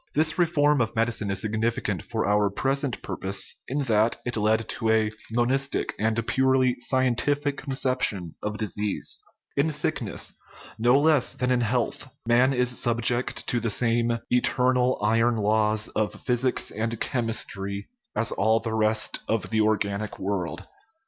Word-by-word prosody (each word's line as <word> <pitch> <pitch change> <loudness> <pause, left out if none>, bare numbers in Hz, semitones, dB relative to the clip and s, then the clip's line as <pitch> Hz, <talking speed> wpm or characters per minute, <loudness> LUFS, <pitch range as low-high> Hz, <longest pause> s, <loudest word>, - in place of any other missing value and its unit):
This 155 +3 +2
reform 150 -5 +3
of 115 0 -1
medicine 115 -2 0
is 95 -1 -1
significant 110 -4 -1
for - - -3
our 105 0 +3
present 135 +5 -1
purpose 95 0 -1
in 140 +2 -1
that 110 -2 +2
it 120 - -3
led 110 +1 +2
us - - -8
to 110 - -2
a 110 -1 +2 0.2
monistic 130 +4 0
and 110 +1 0
purely 130 -1 +2
scien 130 -1 +2
tific 145 +2 0
conception 130 - 0
of 105 0 -3
disease. 105 -1 -2 0.4
In 140 +3 +2
sickness, 150 - -2 0.5
no 120 +4 +4
less 150 -3 +2
than 125 0 -1
in 125 -1 +2
health, 120 +3 -1 0.2
man 125 +3 +4
is 125 -1 +1
subject 120 +1 +1
to 120 - 0
the 115 0 -1
same 115 +1 +2
eternal 125 +1 +2
"iron 115 +2 +2
laws" 110 0 +2
of 110 -1 -2
physics 125 +1 0
and 115 +1 -3
chemistry 100 -4 -2 0.3
as 115 - +1
all 110 +3 +2
the 115 0 -4
rest 110 0 +2
of 110 -1 -1
the 110 -1 +2
organic 105 -1 -1
world. 95 -3 -3
115 Hz, 150 wpm, -25 LUFS, 110-130 Hz, 0.5 s, no